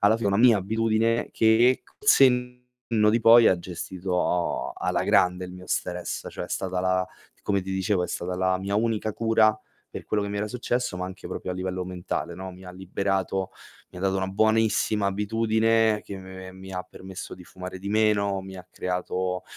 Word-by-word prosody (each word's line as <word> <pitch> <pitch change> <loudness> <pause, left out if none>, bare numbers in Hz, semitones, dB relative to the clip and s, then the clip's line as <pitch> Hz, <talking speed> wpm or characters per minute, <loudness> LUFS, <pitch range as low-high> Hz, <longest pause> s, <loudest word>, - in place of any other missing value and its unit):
alla 105 +2 +4
fine 115 -3 -1
una 100 - +2
mia 120 -2 +6
abitudine 110 +3 +1
che 115 +3 +4
col 425 - -7
senno 125 - +4 0.5
di 115 +1 +2
poi 115 0 +8
ha 95 - +3
gestito 90 0 -2
alla - - -1
grande 90 0 +3
il 90 - -9
mio 90 0 -11
stress. 90 -1 -3
Cioè, - - -5
è - - -11
stata 95 -1 -2
la 95 0 +1 0.4
come 100 -1 0
ti 95 +1 -7
dicevo, 95 0 0
è - - -6
stata 90 +1 -3
la 95 0 +1
mia 100 +2 -3
unica 110 -1 0
cura 110 -1 +3 0.3
per - - -7
quello 105 - 0
che - - -4
mi 100 - -3
era 105 +1 -2
successo, 120 -3 -2
ma 90 - -3
anche 95 0 -8
proprio 90 - -5
a - - -5
livello 95 0 -3
mentale, 90 -1 -4
no. 95 0 -7
Mi 90 +1 -13
ha 90 - -9
liberato, 95 0 -2 0.4
mi 90 - -10
ha - - -8
dato 95 0 +1
una 95 0 -1
buonissima 110 0 +2
abitudine 110 +2 +2
che 100 - -8
me 95 0 -10
mi 95 0 -11
ha 90 0 -3
permesso 95 0 -9
di 90 - -14
fumare 90 +1 -8
di 100 +2 -6
meno, 100 -2 +2
mi 95 0 -9
ha 90 - -11
creato, 90 0 -3
95 Hz, 195 wpm, -26 LUFS, 95-110 Hz, 0.5 s, poi